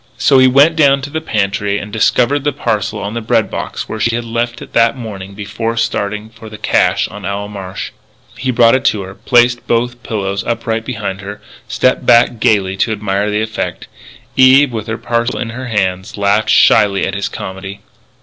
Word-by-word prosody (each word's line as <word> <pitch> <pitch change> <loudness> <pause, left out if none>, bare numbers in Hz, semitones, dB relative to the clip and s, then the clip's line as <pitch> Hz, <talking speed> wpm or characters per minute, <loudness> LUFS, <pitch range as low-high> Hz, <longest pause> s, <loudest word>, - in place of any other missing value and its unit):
So 135 - +4
he 130 - +6
went 140 +5 +5
down 140 -3 +3
to 145 - -6
the 160 +1 -3
pantry 100 -5 -1
and 105 +1 -7
discovered 125 +5 +2
the 145 - +1
parcel 110 -7 -2
on 100 +1 -4
the 115 - -3
bread 110 - 0
box - - -5
where 110 - -5
she 115 +1 +1
had 120 0 -3
left 120 +1 -2
it - - -12
that 115 +3 +3
morning 100 -5 -8
before 115 +3 -4
starting 105 -2 -2
for 110 -1 -12
the 105 - -9
cache - - +1
on - - -10
Owl 100 +1 -4
Marsh. 100 -2 -7 0.4
He 130 - -4
brought 115 -2 +4
it 130 - +1
to 105 -2 +1
her, 95 0 -9
placed 120 +2 +2
both 120 +1 -1
pillows 100 -4 -3
upright 115 -1 -2
behind 100 -6 -4
her, 100 +1 -8 0.3
stepped - - +1
back 120 0 +4
gaily 100 -3 +2
to 110 +3 +1
admire 105 -1 -1
the 105 +1 0
effect. 110 0 -4 0.5
Eve, 130 +1 +6
with 110 -1 -4
her 110 0 -3
parcel 120 +1 -1
in 115 - -4
her 125 +2 -6
hands, 95 -3 -2
laughed 100 +2 +1
shyly 100 -2 +4
at 95 - -3
his 100 0 -2
comedy. 95 +1 -7
110 Hz, 200 wpm, -15 LUFS, 100-120 Hz, 0.5 s, he